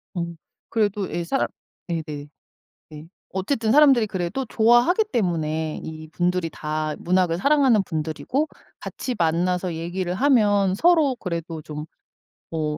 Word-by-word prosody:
음. 170 Hz, -1 st, -4 dB, 0.3 s
그래도 205 Hz, -3 st, 0 dB
예 175 Hz, -, -2 dB
사람 270 Hz, +11 st, 0 dB, 0.4 s
네네. 150 Hz, -4 st, -4 dB, 0.6 s
네. 155 Hz, +1 st, -10 dB, 0.2 s
어쨌든 220 Hz, +4 st, 0 dB
사람들이 275 Hz, -6 st, +6 dB
그래도 190 Hz, +6 st, -3 dB
좋아하기 240 Hz, -, +4 dB
때문에 160 Hz, -7 st, -1 dB
이 155 Hz, 0 st, -8 dB
분들이 175 Hz, 0 st, 0 dB
다 155 Hz, 0 st, -3 dB
문학을 180 Hz, -1 st, +1 dB
사랑하는 265 Hz, -1 st, +4 dB
분들이고 165 Hz, -, -2 dB, 0.3 s
같이 255 Hz, -, -5 dB
만나서 175 Hz, +1 st, +1 dB
얘기를 175 Hz, +2 st, -3 dB
하면 205 Hz, -6 st, +3 dB
서로 320 Hz, -, +4 dB
그래도 170 Hz, -5 st, -5 dB
좀 150 Hz, +1 st, -7 dB, 0.7 s
어 155 Hz, -2 st, -2 dB
180 Hz, 280 characters per minute, -23 LUFS, 160-230 Hz, 0.7 s, 사람들이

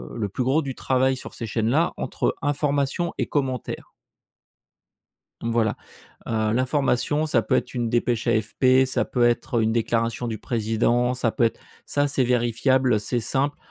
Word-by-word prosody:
le 110 Hz, -4 st, -2 dB
plus 125 Hz, -, -2 dB
gros 135 Hz, +6 st, +2 dB
du 135 Hz, -1 st, -4 dB
travail 130 Hz, 0 st, +1 dB
sur 130 Hz, -, -9 dB
ces 115 Hz, -, -5 dB
chaînes 110 Hz, 0 st, -1 dB
là, 155 Hz, +7 st, +2 dB
entre -, -, -1 dB
information 145 Hz, +3 st, 0 dB
et -, -, -1 dB
commentaire. 130 Hz, -4 st, -3 dB, 1.5 s
Mmh, 115 Hz, -, -1 dB
voilà. 115 Hz, -2 st, +1 dB, 0.5 s
Heu, 110 Hz, -1 st, 0 dB
l'information 135 Hz, +3 st, +1 dB
ça 120 Hz, -7 st, +2 dB
peut -, -, 0 dB
être -, -, -3 dB
une 120 Hz, -2 st, -1 dB
dépêche 120 Hz, -1 st, 0 dB
AFP, 130 Hz, +4 st, +3 dB
ça 130 Hz, -, 0 dB
peut 120 Hz, -2 st, 0 dB
être, 120 Hz, 0 st, -1 dB
heu, -, -, +2 dB
une 110 Hz, 0 st, +1 dB
déclaration 115 Hz, +1 st, 0 dB
du 110 Hz, -1 st, -4 dB
président, 120 Hz, +2 st, 0 dB
ça 125 Hz, -2 st, 0 dB
peut 120 Hz, -, +1 dB
être 115 Hz, -, 0 dB, 0.2 s
ça 145 Hz, 0 st, 0 dB
c'est 135 Hz, -2 st, +1 dB
vérifiable, 125 Hz, 0 st, +2 dB
c'est 115 Hz, +4 st, -2 dB
simple, 135 Hz, +5 st, -1 dB
125 Hz, 170 wpm, -24 LUFS, 115-135 Hz, 1.5 s, AFP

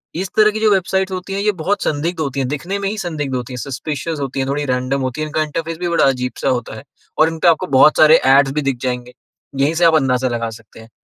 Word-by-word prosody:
इस 185 Hz, +3 st, -3 dB
तरह 215 Hz, 0 st, +5 dB
की 215 Hz, -, -4 dB
जो 215 Hz, -1 st, +3 dB
वेबसाइट्स 190 Hz, 0 st, 0 dB
होती 185 Hz, +1 st, -5 dB
हैं, 200 Hz, -, -2 dB
ये 210 Hz, +1 st, +2 dB
बहुत 205 Hz, +5 st, 0 dB
संदिग्ध 160 Hz, +4 st, -2 dB
होती 140 Hz, -3 st, -3 dB
हैं, 130 Hz, -, -1 dB
दिखने 175 Hz, +8 st, -3 dB
में 200 Hz, -1 st, -1 dB
ही 215 Hz, -, -5 dB
संदिग्ध 150 Hz, -8 st, -3 dB
होती 125 Hz, 0 st, -5 dB
हैं, -, -, -6 dB
सस्पिशस 150 Hz, +4 st, -4 dB
होती 135 Hz, -1 st, -4 dB
हैं, 135 Hz, -, -1 dB
थोड़ी 145 Hz, +1 st, -1 dB
रैंडम 130 Hz, +1 st, -1 dB
होती 130 Hz, +3 st, -3 dB
हैं। 155 Hz, -, -2 dB
इनका 155 Hz, +1 st, -1 dB
इंटरफ़ेस 165 Hz, +2 st, -4 dB
भी 180 Hz, -, -2 dB
बड़ा 170 Hz, -, +2 dB
अजीब-सा 125 Hz, 0 st, -1 dB
होता 125 Hz, -4 st, -2 dB
है 110 Hz, -, -10 dB, 0.4 s
और 155 Hz, +1 st, +5 dB
इनपे 165 Hz, +1 st, -1 dB
आपको 170 Hz, +2 st, +3 dB
बहुत 155 Hz, +3 st, +6 dB
सारे 155 Hz, +1 st, +7 dB
एड्स 135 Hz, +1 st, +5 dB
भी 150 Hz, -, -1 dB
दिख 135 Hz, -2 st, -1 dB
जाएंगे। 125 Hz, -1 st, -3 dB, 0.5 s
यहीं 140 Hz, +3 st, +2 dB
से 170 Hz, +1 st, +3 dB
आप 165 Hz, -1 st, +5 dB
अंदाज़ा 130 Hz, -3 st, +1 dB
लगा 115 Hz, -1 st, -2 dB
सकते 115 Hz, 0 st, -14 dB
हैं। 110 Hz, 0 st, -14 dB
150 Hz, 260 wpm, -18 LUFS, 130-170 Hz, 0.5 s, सारे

